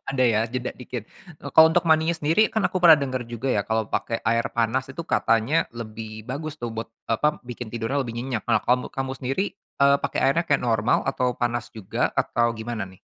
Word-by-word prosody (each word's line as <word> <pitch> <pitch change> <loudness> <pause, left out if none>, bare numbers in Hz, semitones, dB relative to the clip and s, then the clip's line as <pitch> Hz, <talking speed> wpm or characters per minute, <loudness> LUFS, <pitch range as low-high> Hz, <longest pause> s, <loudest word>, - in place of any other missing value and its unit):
ada 135 -1 -2
ya, 110 -2 +3
jeda 125 -1 -2
dikit. 125 -3 -7 0.3
Eee, 140 - -6
kalau 160 0 +8
untuk 175 0 +2
mandinya 160 +1 +4
sendiri, 165 +7 +2
kan 220 - +1
aku - - -5
pernah 165 -4 +9
denger 130 -2 -2
juga 120 +2 -5
ya 105 -5 +2
kalau 110 -1 0
pakai 115 - -2
air 115 +1 +2
panas 120 +3 0
itu 150 - -6
katanya 115 +9 +2
lebih 110 -1 -8
bagus 155 +3 -5
tuh 120 - -3
buat, 115 - -4 0.2
eee, - - +2
apa, 150 0 0
bikin 120 -2 -7
tidurnya 120 +4 -1
lebih 120 - -5
nyenyak. 125 -3 -3
Nah, 110 -2 +2
kamu 125 +1 0
kamu 135 0 -3
sendiri, 135 +11 -1 0.4
eee, 140 0 +6
pakai - - -2
airnya 165 +5 +2
kayak 145 -3 +2
normal, 115 -1 +2
atau 125 -2 0
panas 120 -1 -1
juga, 110 -5 -2
atau 120 0 +1
gimana, 110 -1 -4
nih? 95 -1 -15
125 Hz, 210 wpm, -24 LUFS, 115-140 Hz, 0.4 s, pernah